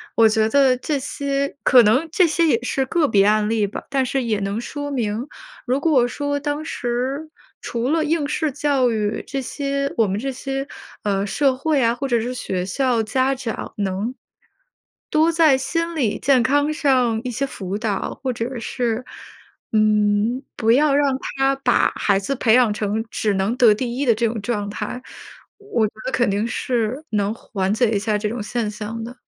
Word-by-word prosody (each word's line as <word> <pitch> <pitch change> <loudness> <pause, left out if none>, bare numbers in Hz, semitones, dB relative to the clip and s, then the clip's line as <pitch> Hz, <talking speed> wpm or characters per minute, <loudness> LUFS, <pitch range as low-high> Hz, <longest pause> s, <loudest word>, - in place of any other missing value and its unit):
我 225 -1 +6
觉 220 0 +2
得 265 0 +4
这 290 +3 -2
些 280 +1 -2
可 250 -3 +7
能 245 +10 +3
这 365 0 +4
些 330 +1 +2
也 235 -6 +2
是 265 +1 0
个 315 +3 +1
别 200 -2 +4
案 210 0 +3
例 215 -3 +1
吧。 200 - -7
但 270 -1 +1
是 265 0 -1
也 220 -3 0
能 200 +2 -2
说 290 +3 -5
明， 230 -1 -2 0.4
如 255 +2 +1
果 270 -7 +3
说 285 +3 -2
当 295 +1 -3
时 265 +3 -3 0.3
除 235 +1 -3
了 320 +1 +2
应 310 -2 0
试 310 +1 -1
教 275 -2 +1
育 210 -1 -1
这 275 0 -3
些 275 +1 -2
我 225 - +4
们 195 +2 -2
这 270 +3 -3
些， 270 +2 -4 0.4
呃， 200 -2 0
社 270 +5 +2
会 285 0 +1
啊， 230 0 +2
或 275 +2 -3
者 240 -2 +2
是 245 +3 -3
学 185 -7 -3
校 245 +4 +1
家 260 +5 +1
长 255 -4 -5
能， 200 +4 -2 1.0
多 315 +2 +3
在 320 -5 +4
心 335 +5 -2
理 245 -9 0
健 265 -3 +3
康 290 +3 +2
上 255 -7 +2
一 250 - -3
些 270 +4 -1
辅 195 -7 -5
导， 210 -3 -3
或 255 - 0
者 240 +2 -4
是， 240 +1 -2 0.7
嗯， 215 +3 +2
不 225 -1 +2
要 285 +2 +4
让 280 -2 +2 0.2
他 270 0 +2
把 255 -3 +2
孩 200 -2 +2
子 200 +8 -2
培 230 -3 +2
养 245 -4 +4
成 215 +2 -2
只 210 -2 0
能 195 +5 0
得 235 -4 +6
第 240 +3 -3
1 280 - 0
的 235 - +5
这 230 +1 +1
种 220 -2 -4
状 205 -2 -2
态， 250 +4 -5 0.6
我 410 - 0
觉 - - -12
得 260 - -2
肯 240 -5 +2
定 205 +2 0
是 245 +3 -2
能 205 -1 0
缓 195 -3 -2
解 225 0 +2
一 210 - +1
下 210 0 0
这 210 0 -2
种 230 -2 -4
现 230 0 -2
象 215 +2 -6
的， 250 +2 -10
245 Hz, 205 characters per minute, -21 LUFS, 215-275 Hz, 1.0 s, 可